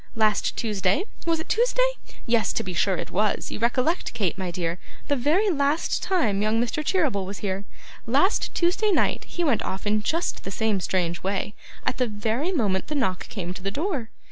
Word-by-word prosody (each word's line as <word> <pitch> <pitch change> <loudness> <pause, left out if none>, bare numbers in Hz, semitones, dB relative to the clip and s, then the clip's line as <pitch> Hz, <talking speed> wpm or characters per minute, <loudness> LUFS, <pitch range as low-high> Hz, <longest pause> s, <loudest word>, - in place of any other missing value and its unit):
Last 215 -2 +2
Tuesday 205 - +1 0.2
was 330 -1 +2
it 320 - -5
Tuesday? - - +3 0.3
Yes, 230 -2 +2
to - - -1
be 185 - -4
sure 185 +2 +2
it - - -5
was; 210 +3 0
you - - -4
recollect, 255 +9 +1
Kate, 195 -7 0
my 185 -2 -3
dear, 170 0 -2 0.3
the 285 - +3
very 320 - +3
last 285 +1 +1
time 225 - +1
young 215 +2 +2
Mr. 245 +6 0
Cheeryble 300 - +1
was 195 +1 -6
here 195 +1 -2 0.4
last 280 - +2
Tuesday 365 +5 +2
night 380 - +2
he 350 - -3
went 275 -9 +2
off 190 +2 -4
in 210 +1 +2
just 330 +10 -1
the - - -4
same 215 0 0
strange 175 -1 -1
way, 195 +2 -2 0.3
at - - 0
the 250 - +3
very 225 - -1
moment 205 - 0
the 300 - -3
knock 190 -10 0
came 180 -4 -4
to 185 - -9
the 195 - -1
door. 280 - -2
225 Hz, 195 wpm, -25 LUFS, 195-305 Hz, 0.4 s, Tuesday